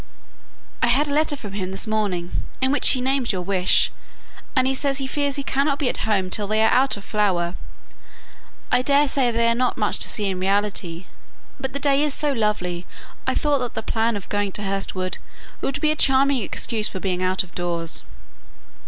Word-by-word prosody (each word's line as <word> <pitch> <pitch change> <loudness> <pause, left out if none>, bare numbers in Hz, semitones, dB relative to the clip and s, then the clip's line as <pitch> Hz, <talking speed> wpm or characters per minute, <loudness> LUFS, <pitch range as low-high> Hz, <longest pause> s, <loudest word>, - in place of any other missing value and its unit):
"I - - +3
had 275 +5 +3
a - - -1
letter 300 0 +2
from 210 -8 -8
him 190 -2 -3
this 190 +3 -2
morning, 205 -6 -1 0.3
in 265 0 +2
which 290 - +3
he 255 - +1
named 265 -1 +1
your 185 -3 -3
wish, 185 -1 +3 0.6
and 260 -1 +3
he 265 - +2
says 275 0 +1
he 270 - -2
fears 285 +1 0
he 280 - -2
cannot 275 +1 0
be 275 -4 0
at - - -3
home 190 -3 +1
till 205 0 -1
they 215 +1 +2
are - - +4
out 265 -2 +3
of 200 - -10
flower. 185 -5 0 1.2
I - - +5
daresay 280 -2 +3
they 230 0 +1
are 230 - +4
not 250 +1 0
much 210 -2 +2
to - - +1
see 210 - -1
in 190 -2 -1
reality, 190 -3 -1 0.5
but 265 0 -4
the 280 - -2
day 280 -1 +3
is 295 -2 +1
so 295 -2 +1
lovely 185 -7 -1 0.4
I - - +1
thought 295 -2 +2
that 245 -1 -4
the 220 - -3
plan 225 +1 0
of 200 - -9
going 205 -1 -1
to 210 - -2
Hurst 195 0 -2
Wood 185 0 -3 0.4
would 275 - -2
be 305 -1 +2
a - - +1
charming 270 -2 +3
excuse 215 +1 0
for 190 - -6
being 185 -1 -2
out 185 +1 +1
of 185 - -17
doors." 170 -2 -1
220 Hz, 210 wpm, -22 LUFS, 190-270 Hz, 1.2 s, I